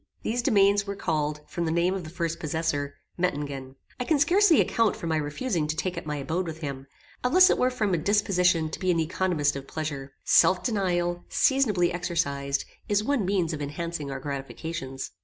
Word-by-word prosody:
These 240 +2 0
domains 200 -4 +3
were 200 - -3
called, 150 -5 -1
from 170 - -3
the 160 - 0
name 170 +3 +2
of 190 -2 -4
the 155 - -8
first 165 0 -3
possessor, 150 -3 -2 0.2
Mettingen. 140 -6 -2 0.2
I - - 0
can 310 +4 +2
scarcely 345 +3 +5
account 230 -3 +2
for - - -7
my 160 -1 +1
refusing 155 - -1
to 155 - -1
take 185 +3 -2
up 170 - -6
my 150 - -2
abode 165 +6 -2
with 160 0 -7
him, 140 -2 -5 0.4
unless 365 +9 +6
it - - +2
were 255 - +3
from 215 -6 -1
a 170 - +2
disposition 180 -4 +2
to - - -5
be 185 - -1
an 170 -2 +3
economist 160 -3 0
of 135 0 -7
pleasure. 140 -3 -5
Self 185 -1 +4
denial, 175 -6 0
seasonably 215 -11 +2
exercised, 140 -6 -1 0.2
is 205 0 +2
one 260 -4 0
means 180 -4 +1
of 150 - -5
enhancing 150 +1 -4
our 135 -1 -4
gratifications. 135 0 -5
170 Hz, 195 wpm, -26 LUFS, 150-200 Hz, 0.4 s, unless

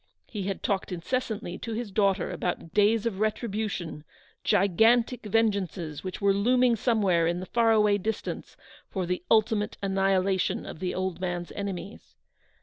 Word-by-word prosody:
He 200 -4 -5
had 195 - -4
talked 195 -1 -1
incessantly 220 +5 -3
to 230 - -5
his 225 -2 -4
daughter 195 -2 +1
about 170 -2 -3
days 210 +2 +3
of 210 -5 -2
retribution; 210 -7 -2 0.4
gigantic 225 +6 +3
vengeances 195 -8 0
which 185 -1 -5
were 200 -1 +3
looming 245 +4 +3
somewhere 200 -8 +2
in 175 +1 0
the 185 - -5
far 230 +2 +2
awav 210 -2 +3
distance, 220 +2 -4 0.3
for 190 -3 -2
the 180 0 -2
ultimate 215 -1 +2
annihila 195 -1 +2
tion - - -1
of - - -8
the 180 0 -2
old 185 -1 -2
man's 175 -1 -3
enemies. 200 -1 -6
200 Hz, 150 wpm, -27 LUFS, 185-220 Hz, 0.4 s, days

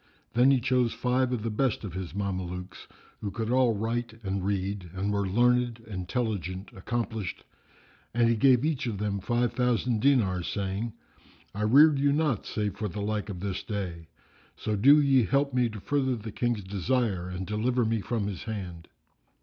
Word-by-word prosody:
Then 125 +3 +5
he 135 -2 +4
chose 125 -1 +1
five 125 +2 +1
of 120 -4 -2
the 115 - -1
best 120 +1 0
of 100 -5 -6
his 95 -3 -6
Mamelukes, 90 -2 -4 0.3
who 105 - -3
could 110 +4 -3
all 125 -4 +3
write 115 +1 -3
and 95 -1 -2
read 100 -1 -2
and 100 +2 -1
were 100 -1 0
learned, 120 +3 +2
intelligent, 95 - -3
accomplished; 110 0 -3 0.7
and 120 0 +3
he 115 - +3
gave 125 +3 +4
each 145 -4 -1
of 110 -4 -2
them 100 0 -1
five 120 +4 0
thousand 125 -1 +1
dinars, 105 -11 +2
saying, 100 +3 -3 0.6
"I 105 - -5
reared 140 +7 +6
you 140 0 +3
not 145 -6 0
save 105 -2 -2
for 105 0 -2
the 105 +2 -6
like 105 +1 -2
of 90 -3 -6
this 95 -2 -3
day; 90 -6 -5 0.5
so 110 - -2
do 140 +9 +7
ye 135 -4 +4
help 140 +2 +1
me 125 -2 +2
to 110 -1 -7
further 130 +3 0
the 110 -1 -7
King's 120 -1 -1
desire 100 -1 -1
and 90 +1 -4
deliver 115 +4 0
me 110 -1 0
from 110 0 -2
his 100 -2 -5
hand." 90 -6 -6
110 Hz, 180 wpm, -28 LUFS, 100-125 Hz, 0.7 s, do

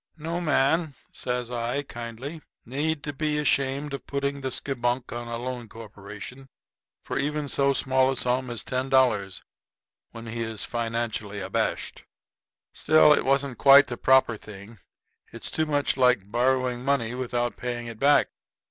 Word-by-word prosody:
"No 165 +3 -3
man," 155 0 +2 0.2
says 125 -1 -3
I, 120 +4 -2
kindly, 120 +5 -7 0.2
"need 145 +4 -2
to 145 - -4
be 150 +1 -1
ashamed 140 -1 0
of 140 - -6
putting 140 0 -2
the 135 - -2
skibunk 125 -1 -2
on 120 0 -5
a 120 0 -4
loan 120 -1 -5
corporation 110 +4 -10 0.5
for - - -3
even 150 +1 -1
so 140 0 +2
small 130 0 +2
a 135 - -3
sum 125 +1 0
as 120 -2 -4
ten 130 +1 -2
dollars, 110 -8 +2 0.7
when 115 0 -10
he 115 +1 -5
is 110 -2 -3
financially 115 -3 -3
abashed. - - -2 0.7
Still, 155 0 +5
it - - +1
wasn't 135 -1 +1
quite 140 +1 +8
the 120 - -3
proper 130 -3 +4
thing. 105 +1 -12 0.5
It's - - -5
too 160 0 0
much 145 -2 0
like 125 -6 +3
borrowing 125 0 +1
money 135 -4 0
without 120 -1 -2
paying 120 -1 -4
it 115 -2 -8
back." 145 +1 +4
130 Hz, 155 wpm, -26 LUFS, 115-140 Hz, 0.7 s, quite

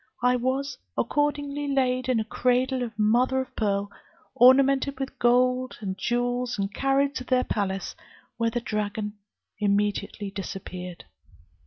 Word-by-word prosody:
I 250 0 +4
was 260 +3 -1 0.2
accordingly 290 0 0
laid 255 -2 +1
in 250 -3 +3
a - - 0
cradle 255 +3 +1
of 230 -3 -5
mother 245 +5 +3
of 260 - -5
pearl, 200 -2 0 0.4
ornamented 270 +2 +5
with 270 0 -5
gold 250 +1 +2
and 195 -4 -4
jewels, 245 +2 -1
and 200 0 -2
carried 275 +3 +1
to 255 - -5
their 255 0 +2
palace, 195 -2 -2 0.4
when 230 0 +1
the 240 +1 -2
dragon 210 -1 -3 0.5
immediately 205 0 0
disappeared. 185 -2 -7
245 Hz, 135 wpm, -26 LUFS, 210-260 Hz, 0.5 s, ornamented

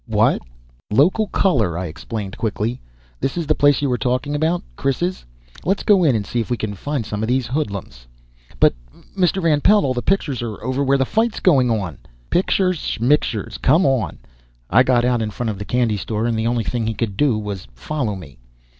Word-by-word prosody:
"What - - +2 0.3
" - - -35
"Local 175 - +3
color," 115 - +1
I 90 - -3
explained 95 +4 -6
quickly. 110 +2 -2 0.4
"This 135 - -2
the 160 -3 +1
place 145 -1 +3
you - - +2
were 125 -1 0
talking 125 +5 -1
about? 160 +4 0
Chris's? 175 +7 -1 0.4
Let's 195 +3 0
go 195 -4 +5
in 140 -7 +4
and 105 -2 -1
see 120 - -2
if 115 - -2
we 120 - 0
can 110 -2 -3
find 135 +4 -3
some 105 0 -4
of 110 - -1
these 130 0 +1
hoodlums." 100 - -4 0.5
"But, - - +5 0.4
Mr. 185 0 +1
Van 150 -3 +3
Pelt, 210 +1 +5
all 130 - +1
the 120 - -2
pictures 150 -9 0
are 115 -3 -4
over 130 +3 0
where 140 0 +3
the 135 - +1
fight's 225 - 0
going 135 -9 +4
on!" 95 - -2 0.3
"Pictures, 185 -1 +2 0.2
shmictures! 120 -3 0
Come 155 +7 +4
on!" 135 -4 0 0.5
I - - +6
got 125 -2 +3
out 125 -2 +2
in 110 - -1
front 115 +1 -3
of 100 - -7
the 100 - -5
candy 120 -3 +1
store, 110 +3 -2
and 120 -1 0
the 110 +1 0
only 120 -1 0
thing 115 0 -2
he 110 - -2
could 105 -4 -2
do 130 -1 +2
was 100 - -5
follow 110 - -3
me. 70 -9 -11
125 Hz, 205 wpm, -20 LUFS, 110-150 Hz, 0.5 s, I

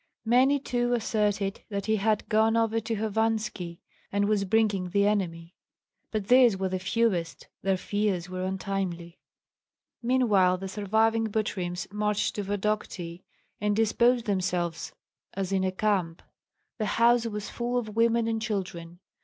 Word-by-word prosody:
Many 260 +5 +4
too 245 -2 -1
asserted 210 -4 0
that 200 -2 -3
he 220 0 +2
had 215 +1 0
gone 220 +1 +3
over 225 0 +2
to 225 +1 -3
Hovanski 215 -5 -2 0.3
and 200 0 +1
was 205 -2 +1
bringing 200 -3 +1
the 200 +2 +2
enemy; 175 -5 -1 0.6
but 215 -3 -3
these 245 -5 +6
were 190 0 -1
the 185 0 -2
fewest, 190 -3 -1
their 195 0 +1
fears 200 -2 -1
were 185 0 -4
untimely. 185 -3 -3 0.8
Meanwhile 215 -7 +3
the 195 +1 -6
surviving 220 +3 +1
Butryms 185 -5 -2
marched 210 0 0
to 205 - -3
Vodokty, 195 -4 -3 0.4
and 210 0 +1
disposed 235 +2 +3
themselves 180 -4 -1 0.4
as 195 -1 -2
in 190 -1 +1
a 185 - +1
camp. 185 -4 -1 0.6
The 215 - 0
house 235 0 +4
was 210 -2 -5
full 240 +1 -2
of 215 -3 -3
women 230 0 +3
and 225 -1 -1
children. 180 -5 -4
210 Hz, 145 wpm, -27 LUFS, 185-225 Hz, 0.8 s, these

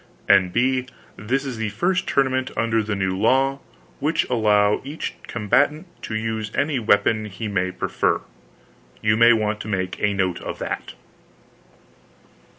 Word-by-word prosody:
N.B. 120 +7 +3 0.3
This 130 +6 -2
is 130 -4 -4
the 110 -1 -2
first 175 - 0
tournament 130 -1 +1
under 115 -1 +1
the 105 -1 -2
new 95 -1 -1
law, 135 +7 +2 0.4
whidh 155 +4 +1
allow 105 -3 +3
each 145 +4 -5
combatant 145 - +1 0.2
to 110 - -5
use 110 -1 -2
any 140 -2 +1
weapon 110 0 +2
he 105 +2 -6
may 95 -3 0
pre 90 - -4
fer. - - +1 0.8
You 105 0 +3
may 115 +1 +6
want 110 -2 +1
to - - -7
make 95 -3 -3
a 105 -1 +1
note 95 -3 0
of - - -5
that. - - -5
110 Hz, 150 wpm, -22 LUFS, 105-130 Hz, 0.8 s, may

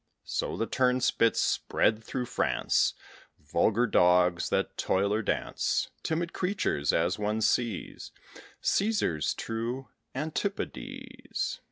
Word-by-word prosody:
So - - -2
the 115 - 0
Turnspits 125 -2 +2
spread 110 +1 +1
through 125 +2 -3
France - - +1 0.4
Vulgar 115 +3 +1
dogs, 90 -4 +3
that - - 0
toil 100 +2 +1
or 110 - +1
dance: - - -1
Timid 170 +1 -2
creatures, 180 - 0
as 85 +4 +1
one 105 +1 0
sees 115 -1 -1 0.5
Cæsar's 200 - +1
true 120 +4 -4 0.3
antipodes. 255 - -4
115 Hz, 100 wpm, -29 LUFS, 105-170 Hz, 0.5 s, dogs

